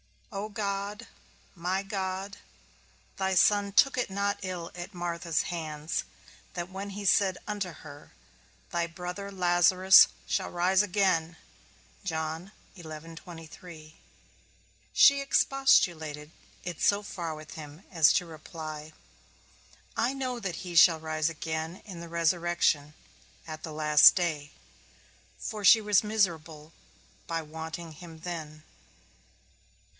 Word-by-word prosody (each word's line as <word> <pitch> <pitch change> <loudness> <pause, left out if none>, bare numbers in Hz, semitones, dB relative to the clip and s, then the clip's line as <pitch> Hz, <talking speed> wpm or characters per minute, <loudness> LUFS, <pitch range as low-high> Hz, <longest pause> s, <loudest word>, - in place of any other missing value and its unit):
O 205 +1 -4
God, 205 +1 -4 0.5
my 185 +2 -2
God, 195 0 -4 0.8
thy 190 -1 0
Son 200 +2 +4
took 275 +6 +4
it 245 - -1
not 200 +1 -1
ill 180 -3 -5
at 180 +2 -8
Martha's 170 -2 -1
hands, 155 -2 -4 0.5
that 175 +1 -5
when 195 +1 -6
he 205 +1 -6
said 190 -1 +3
unto 205 -3 -3
her, 145 -3 -13 0.6
Thy 170 -1 0
brother 180 +3 -6
Lazarus 185 0 +6 0.2
shall - - -1
rise 180 +2 +3
again, 180 -5 +1 0.7
she 165 +3 -5 2.4
expostulated 170 - +2 0.3
it 175 -2 -6
so 205 +1 +3
far 170 -5 -5
with 155 0 -11
him 155 +2 -10
as 165 -4 +5
to 180 - +1
reply, 155 -1 -8 1.0
I 245 +3 +1
know 255 -3 -3
that 195 -6 -4
he 180 -1 -7
shall 165 -1 +7
rise 155 0 -1
again 160 +2 -5
in 185 -5 -9
the 170 0 -8
resurrection, 170 -3 +1 0.5
at 155 -1 -8
the 160 - -6
last 150 -1 +7
day; 155 -5 -2 0.9
for 215 -3 -6
she 220 +4 +8
was 210 -1 +3
miserable 165 -7 -1 0.6
by 165 -1 -2
wanting 160 +2 -7
him 160 0 -12
then. 155 -3 -7
175 Hz, 115 wpm, -28 LUFS, 160-195 Hz, 2.4 s, she